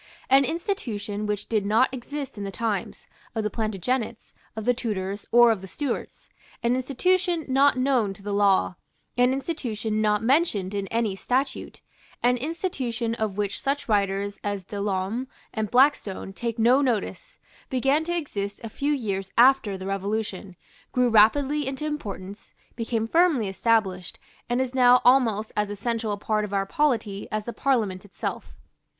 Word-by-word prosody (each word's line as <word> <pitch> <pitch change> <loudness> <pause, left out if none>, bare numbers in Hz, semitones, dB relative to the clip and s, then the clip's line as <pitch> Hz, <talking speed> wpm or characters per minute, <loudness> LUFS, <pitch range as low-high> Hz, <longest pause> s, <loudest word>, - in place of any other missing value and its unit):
An 270 +1 +6
institution 225 - -3
which 210 -1 -2
did 215 -3 +1
not 225 +6 +3
exist 275 +2 -6
in 205 - -6
the 200 - -3
times, 205 -2 -3 0.3
of 220 - -1
the 210 - -1
Plantagenets, 220 +2 -2 0.2
of 220 -1 -5
the 245 - +4
Tudors 205 -4 -4
or 240 -1 +7
of 215 -4 -1
the 190 - -8
Stuarts, 275 +5 -4 0.4
an 235 +1 +2
institution 335 +6 +1
not 275 +1 +4
known 255 -6 +2
to 195 - -16
the 205 0 -3
law, 200 -3 +3 0.4
an 245 +1 +4
institution 235 -7 -2
not 210 0 +2
mentioned 230 - +2
in 200 -1 -2
any 225 -3 0
statute, 255 +7 -2 0.4
an 245 +1 +4
institution 255 -6 -2
of 220 -4 -2
which 205 -1 -2
such 280 +1 -1
writers 200 -1 0
as 200 -2 -3
De 205 +1 -5
Lolme 200 +5 -1 0.3
and 220 -3 -2
Blackstone 245 -7 +2
take 230 +3 -3
no 245 +5 +5
notice, 270 - -2 0.3
began 270 +4 +2
to 345 +1 -1
exist 200 -10 -4
a 225 - -5
few 285 +6 -1
years 195 -8 -3
after 240 -5 +5
the 190 - -7
Revolution, 195 -1 -3 0.4
grew 250 -1 +2
rapidly 270 +7 +4
into 270 +3 -3
importance, 205 -10 -6 0.2
became 225 -1 -2
firmly 325 - +3
established, 190 -3 0 0.3
and 240 +1 +1
is 260 -1 -2
now 250 -1 +6
almost 230 -5 +4
as 210 -1 0
essential 225 +1 -2
a 205 - -2
part 215 +1 0
of 205 -1 -3
our 195 0 +1
polity 225 -6 0
as 215 0 -1
the 235 - -5
Parliament 220 -9 0
itself. 205 - -6
225 Hz, 160 wpm, -25 LUFS, 205-265 Hz, 0.4 s, or